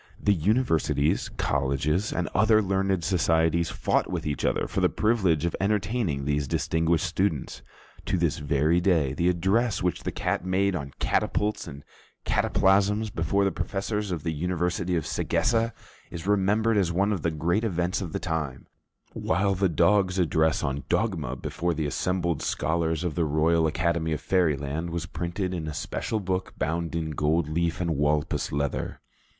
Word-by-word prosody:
The 105 - +3
universities, 85 - +1
colleges, 70 +8 0
and 90 - -1
other 110 +1 +4
learned 95 -2 0
societies 80 -2 +2
fought - - 0
with - - -3
each 75 -2 -2
other - - +1
for - - -2
the - - +4
privilege 95 -8 +1
of 85 - -1
entertaining 100 - 0
these 75 -1 0
distinguished 80 +5 +1
students. 85 -4 -1 0.5
To - - +1
this 80 -4 0
very 75 +3 +2
day, 80 -8 +2
the 85 +5 +1
address 95 +5 +1
which 90 -2 0
the - - -3
cat - - -2
made 95 +1 +1
on 70 -4 -5
catapults 105 -2 0
and 70 -2 -9 0.4
cataplasms, 100 +2 +2
before 85 +5 +1
the 95 - +1
professors 105 +3 -3
of 80 -5 -3
the 80 - -1
University 90 +2 -1
of 80 - -1
Sagessa, 115 0 +1 0.4
is 85 +1 -7
remembered 105 +3 +2
as 90 -4 +2
one 100 +4 +1
of 95 - -3
the 85 - +1
great 85 +7 0
events 90 -2 -1
of 90 -4 -5
the - - -2
time; 80 -7 -3 0.5
while 100 +4 +1
the 95 0 +1
dog's 95 +3 +3
address 80 -3 +2
on 70 +1 -2
dogma 85 - 0
before 85 +6 -2
the 80 0 -1
assembled 85 +2 -1
scholars 80 0 -1
of 85 -3 -1
the 85 - 0
Royal 80 +2 +2
Academy 80 0 0
of 75 - -3
Fairyland 80 -3 0
was 85 0 -3
printed 90 +2 -3
in 80 -3 -4
a 75 - -5
special 110 - -3
book 95 -1 -3
bound 85 +2 -2
in 80 -2 -2
gold 75 +2 +1
leaf 85 +1 -1
and 85 -3 0
walpus 75 +1 0
leather. 70 0 -2
85 Hz, 165 wpm, -26 LUFS, 80-95 Hz, 0.5 s, other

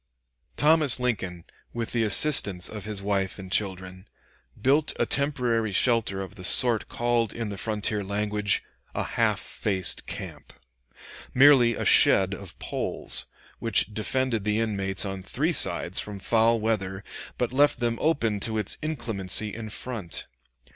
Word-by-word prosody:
Thomas 150 -4 +4
Lincoln, 95 -9 -3 0.3
with 115 -1 -4
the 120 -2 0
assistance 100 -5 +4
of 105 -2 -8
his 105 -2 -4
wife 100 -1 -2
and 95 -2 -10
children, 95 -1 -1 0.5
built 145 +4 +2
a - - 0
temporary 125 -6 0
shelter 110 -2 +1
of 95 - -8
the 90 - -12
sort 115 +3 +4
called 120 -1 -1
in 115 -2 -5
the 100 - -6
frontier 105 -1 0
language 105 +1 -1 0.3
"a - - -1
half - - -1
faced 95 -4 -2
camp"; - - -8 0.8
merely 130 -3 +5
a - - -4
shed 95 0 +5
of 100 -2 -9
poles, - - -1 0.3
which 110 -1 0
defended 115 +1 -1
the 105 +1 -1
inmates 100 -3 -1
on 95 -1 -5
three - - -2
sides - - +2
from 105 -1 -5
foul 115 +3 +1
weather, 100 -3 -3 0.3
but 125 0 -2
left 145 0 +2
them 115 -2 -2
open 115 -10 0
to 110 +2 -3
its 105 -2 -2
inclemency 110 - -1
in 110 -1 -7
front. 105 -5 -6
110 Hz, 145 wpm, -25 LUFS, 100-120 Hz, 0.8 s, merely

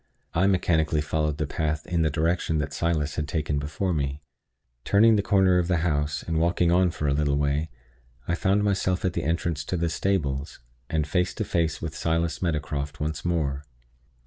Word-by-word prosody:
I 95 +4 +3
mechanically 80 -5 +2
followed 75 0 -1
the 80 - -1
path 75 0 -2
in 85 -2 0
the 80 - +3
direction 80 +1 0
which 75 -1 -2
Silas 80 -3 -1
had 75 - -1
taken 75 -2 -1
before 80 +6 -2
me. 70 -1 -2 0.6
Turning 110 +2 +5
the 105 - +3
corner 95 -2 +3
of 85 - 0
the 90 -1 +2
house, 75 -2 0
and 80 -1 -1
walking 85 +1 +2
on 90 +1 +4
for 75 -3 -3
a 70 - +2
little 70 -1 +1
way, 75 +2 0 0.6
I - - 0
found 95 +4 +2
myself 95 -2 0
at 90 - +1
the 85 - -2
entrance 85 -1 -1
to 90 - -2
the 85 0 0
stables, 75 -6 -1 0.3
and 80 -2 0
face 90 +4 0
to 110 - -2
face 85 -3 -1
with 80 0 -4
Silas 80 0 -1
Meadowcroft 75 -3 -2
once 75 0 -3
more. 75 -5 -1
80 Hz, 190 wpm, -26 LUFS, 75-90 Hz, 0.6 s, Turning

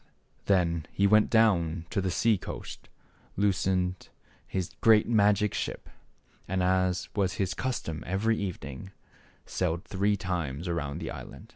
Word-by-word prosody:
Then 85 -5 +1
he 100 - +1
went 105 +1 +5
down 90 -7 +3
to 100 - 0
the 95 - -1
sea 110 +5 +3
coast, 90 - -8 0.5
loosened 95 -2 0 0.4
his 95 -2 -3
great 110 -3 +6
magic 105 -2 +3
ship, - - -4 0.6
and, 95 0 0
as 90 -1 +1
was 95 -3 +1
his 95 -2 -1
custom 105 -12 -3
every 105 +5 +1
evening, 90 -3 -6 0.5
sailed 85 -2 -2
three 100 +1 +1
times 85 -5 -3
around 75 -4 -2
the 80 - -4
island. 110 - -10
95 Hz, 135 wpm, -28 LUFS, 85-105 Hz, 0.6 s, great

